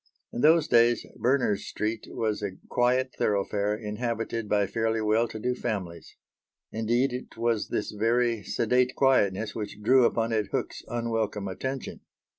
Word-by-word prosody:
In -, -, -3 dB
those 160 Hz, +1 st, +5 dB
days 120 Hz, 0 st, +4 dB
Berners 125 Hz, -5 st, +1 dB
Street 110 Hz, +1 st, -3 dB
was 110 Hz, -2 st, -2 dB
a 100 Hz, -2 st, -4 dB
quiet 125 Hz, +1 st, +1 dB
thoroughfare 105 Hz, 0 st, 0 dB
inhabited 115 Hz, 0 st, -3 dB
by 105 Hz, -1 st, +3 dB
fairly 115 Hz, +3 st, -1 dB
well 110 Hz, +2 st, +2 dB
to 110 Hz, -, -8 dB
do 125 Hz, +3 st, -1 dB
families. 90 Hz, -8 st, -5 dB, 0.6 s
Indeed 120 Hz, +4 st, +1 dB
it 125 Hz, -2 st, -7 dB
was 115 Hz, -2 st, 0 dB
this 105 Hz, -, -2 dB
very 115 Hz, +1 st, +1 dB
sedate 125 Hz, +6 st, +1 dB
quietness 110 Hz, -6 st, +2 dB
which 105 Hz, -1 st, -6 dB
drew 130 Hz, +2 st, +5 dB
upon 115 Hz, 0 st, +1 dB
it 110 Hz, -3 st, 0 dB
Hook's -, -, -3 dB
unwelcome 115 Hz, -4 st, -2 dB
attention. 130 Hz, +8 st, -5 dB
115 Hz, 145 wpm, -27 LUFS, 105-120 Hz, 0.6 s, those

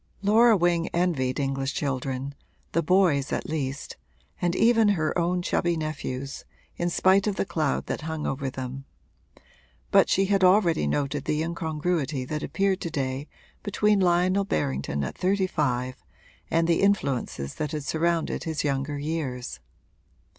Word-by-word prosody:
Laura 220 Hz, +2 st, +5 dB
Wing 175 Hz, -1 st, +2 dB
envied 155 Hz, -8 st, 0 dB
English 135 Hz, 0 st, -1 dB
children, 135 Hz, -1 st, -2 dB, 0.4 s
the 165 Hz, -, +2 dB
boys 165 Hz, -5 st, +3 dB
at -, -, -2 dB
least, 140 Hz, -3 st, -4 dB, 0.4 s
and 175 Hz, 0 st, +1 dB
even 225 Hz, 0 st, +4 dB
her 160 Hz, -7 st, +1 dB
own 175 Hz, +1 st, 0 dB
chubby 175 Hz, -1 st, 0 dB
nephews, 140 Hz, -3 st, -4 dB, 0.3 s
in 175 Hz, -, -1 dB
spite 190 Hz, +3 st, +3 dB
of 205 Hz, -, 0 dB
the -, -, -1 dB
cloud 155 Hz, -6 st, -1 dB
that -, -, -3 dB
hung 160 Hz, 0 st, -4 dB
over 135 Hz, 0 st, -2 dB
them; 130 Hz, 0 st, -6 dB, 1.1 s
but -, -, +5 dB
she 195 Hz, -, +3 dB
had 195 Hz, -1 st, +2 dB
already 180 Hz, -, +4 dB
noted 140 Hz, -, -1 dB
the 155 Hz, +1 st, 0 dB
incongruity 160 Hz, -4 st, -2 dB
that 150 Hz, +3 st, -3 dB
appeared 190 Hz, +6 st, 0 dB
to 170 Hz, -, -3 dB
day 135 Hz, -1 st, -3 dB, 0.3 s
between 210 Hz, 0 st, +2 dB
Lionel 185 Hz, +2 st, +3 dB
Berrington 70 Hz, -, -1 dB
at 65 Hz, -, -4 dB
thirty 190 Hz, +1 st, +1 dB
five 130 Hz, -7 st, -1 dB, 0.5 s
and 165 Hz, 0 st, +2 dB
the 170 Hz, -, +2 dB
influences 140 Hz, -, 0 dB
that 150 Hz, -2 st, -3 dB
had 150 Hz, -2 st, -3 dB
surrounded 165 Hz, +3 st, 0 dB
his 160 Hz, -2 st, -2 dB
younger 140 Hz, 0 st, -1 dB
years. 140 Hz, -, -4 dB
155 Hz, 145 wpm, -26 LUFS, 135-180 Hz, 1.1 s, Laura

